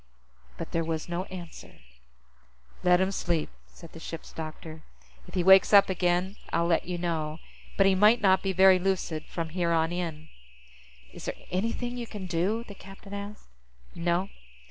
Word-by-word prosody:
But -, -, -6 dB
there 165 Hz, -, 0 dB
was 160 Hz, -1 st, -3 dB
no 175 Hz, +2 st, -3 dB
answer. 175 Hz, -4 st, -10 dB, 1.1 s
"Let 180 Hz, 0 st, +4 dB
him 190 Hz, +1 st, +1 dB
sleep," 170 Hz, -5 st, -1 dB, 0.2 s
said 170 Hz, -2 st, -14 dB
the 165 Hz, -, -11 dB
ship's 165 Hz, 0 st, -8 dB
doctor. 160 Hz, 0 st, -8 dB, 0.5 s
"If -, -, -11 dB
he 180 Hz, -, +1 dB
wakes 190 Hz, +2 st, +7 dB
up 200 Hz, -1 st, +7 dB
again, 180 Hz, +2 st, 0 dB
I'll 170 Hz, -, +1 dB
let 170 Hz, 0 st, +1 dB
you 180 Hz, -1 st, -2 dB
know. 160 Hz, -3 st, -2 dB, 0.4 s
But 195 Hz, -, +5 dB
he 195 Hz, -, +5 dB
might 210 Hz, +5 st, +5 dB
not 190 Hz, -3 st, +4 dB
be 195 Hz, -, -1 dB
very 190 Hz, 0 st, +6 dB
lucid 175 Hz, -4 st, -1 dB
from 165 Hz, -2 st, -4 dB
here 170 Hz, 0 st, -1 dB
on 165 Hz, 0 st, +2 dB
in." 165 Hz, -3 st, -4 dB, 0.8 s
"Is -, -, -9 dB
there -, -, -3 dB, 0.2 s
anything 230 Hz, +6 st, -2 dB
you 240 Hz, -1 st, -5 dB
can 205 Hz, -4 st, -7 dB
do?" 185 Hz, +6 st, 0 dB
the 200 Hz, -, -8 dB
captain 195 Hz, +1 st, -12 dB
asked. 200 Hz, +1 st, -7 dB, 0.5 s
"No. 175 Hz, +3 st, 0 dB
180 Hz, 170 wpm, -28 LUFS, 165-195 Hz, 1.1 s, wakes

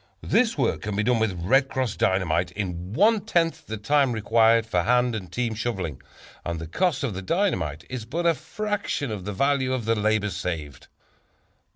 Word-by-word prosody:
This 230 Hz, -6 st, +2 dB
work 130 Hz, -5 st, 0 dB
can 105 Hz, -1 st, -3 dB
be 105 Hz, -, +1 dB
done 120 Hz, +1 st, +2 dB
with 100 Hz, -5 st, 0 dB
"Red 130 Hz, +8 st, +4 dB
Cross" 130 Hz, -5 st, -2 dB
Dynamite 90 Hz, -2 st, +1 dB
in 90 Hz, -2 st, -4 dB
one 210 Hz, -, +4 dB
tenth 170 Hz, -6 st, 0 dB
the 110 Hz, -, -4 dB
time 135 Hz, +4 st, +2 dB
required 115 Hz, +1 st, +3 dB
for 90 Hz, -6 st, +1 dB
hand 125 Hz, +6 st, +2 dB
and 100 Hz, -5 st, -6 dB
team 120 Hz, -2 st, -1 dB
shoveling, 95 Hz, -, -3 dB, 0.4 s
and 85 Hz, -1 st, -3 dB
the 80 Hz, -, -5 dB
cost 145 Hz, -, 0 dB
of 125 Hz, -7 st, -1 dB
the 95 Hz, -, -5 dB
dynamite 95 Hz, -, -1 dB
is 130 Hz, -3 st, -5 dB
but 165 Hz, +9 st, -3 dB
a 170 Hz, -, +5 dB
fraction 205 Hz, -, -3 dB
of 100 Hz, -4 st, -5 dB
the 105 Hz, -, -3 dB
value 135 Hz, +4 st, +1 dB
of 125 Hz, -4 st, -2 dB
the 115 Hz, -, +2 dB
labor 105 Hz, -1 st, +1 dB
saved. 80 Hz, -5 st, -5 dB
110 Hz, 190 wpm, -25 LUFS, 95-140 Hz, 0.4 s, a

